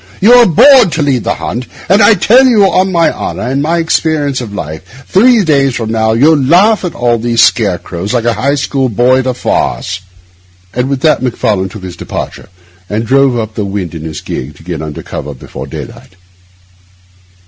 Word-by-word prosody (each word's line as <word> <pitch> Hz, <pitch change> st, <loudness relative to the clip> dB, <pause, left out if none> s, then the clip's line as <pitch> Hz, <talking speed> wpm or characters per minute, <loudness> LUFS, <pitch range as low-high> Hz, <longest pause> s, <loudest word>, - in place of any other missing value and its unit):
You 230 Hz, +6 st, +6 dB
were 245 Hz, -1 st, +6 dB
born 250 Hz, -, +6 dB
to 160 Hz, -1 st, -2 dB
lead 130 Hz, -5 st, 0 dB
the -, -, 0 dB
hunt; 120 Hz, +2 st, -5 dB, 0.2 s
and 195 Hz, +4 st, +3 dB
I 205 Hz, +2 st, +6 dB
tell 245 Hz, +8 st, +4 dB
you, 225 Hz, -5 st, +4 dB
on 190 Hz, 0 st, +2 dB
my 170 Hz, -2 st, +2 dB
honour -, -, -5 dB
and 130 Hz, +3 st, -1 dB
my 165 Hz, +3 st, 0 dB
experience 155 Hz, -4 st, 0 dB
of 115 Hz, -4 st, -7 dB
life, 100 Hz, -, -9 dB
three 230 Hz, +2 st, +3 dB
days 140 Hz, -6 st, +1 dB
from 115 Hz, -3 st, -3 dB
now 110 Hz, 0 st, +1 dB
you'll 145 Hz, +6 st, +3 dB
laugh 190 Hz, +11 st, +3 dB
at 180 Hz, -, -4 dB
all 120 Hz, -1 st, 0 dB
these 115 Hz, 0 st, +2 dB
scarecrows 95 Hz, -3 st, -1 dB
like 120 Hz, -2 st, -1 dB
a 120 Hz, -, +2 dB
High 140 Hz, +5 st, 0 dB
School 135 Hz, -2 st, -1 dB
boy 125 Hz, +4 st, +2 dB
at 130 Hz, -, -2 dB
a 130 Hz, -, -1 dB
farce.' 95 Hz, -5 st, -2 dB, 0.7 s
And 125 Hz, +2 st, -2 dB
with 135 Hz, -2 st, -2 dB
that 155 Hz, -, +2 dB
Macfarlane 105 Hz, -6 st, -1 dB
took 95 Hz, +1 st, -11 dB
his 90 Hz, -2 st, -7 dB
departure -, -, -7 dB, 0.4 s
and 110 Hz, +2 st, -2 dB
drove 135 Hz, 0 st, +2 dB
off 110 Hz, -2 st, -3 dB
up -, -, -29 dB
the 110 Hz, -, -3 dB
wynd 100 Hz, -4 st, -4 dB
in 80 Hz, -, -7 dB
his 80 Hz, -1 st, -7 dB
gig 70 Hz, +3 st, -6 dB
to 75 Hz, -, -17 dB
get 85 Hz, -1 st, -5 dB
under 75 Hz, -1 st, -7 dB
cover 75 Hz, 0 st, -7 dB
before -, -, -9 dB
daylight. 95 Hz, -, -10 dB
130 Hz, 205 wpm, -11 LUFS, 105-160 Hz, 0.7 s, You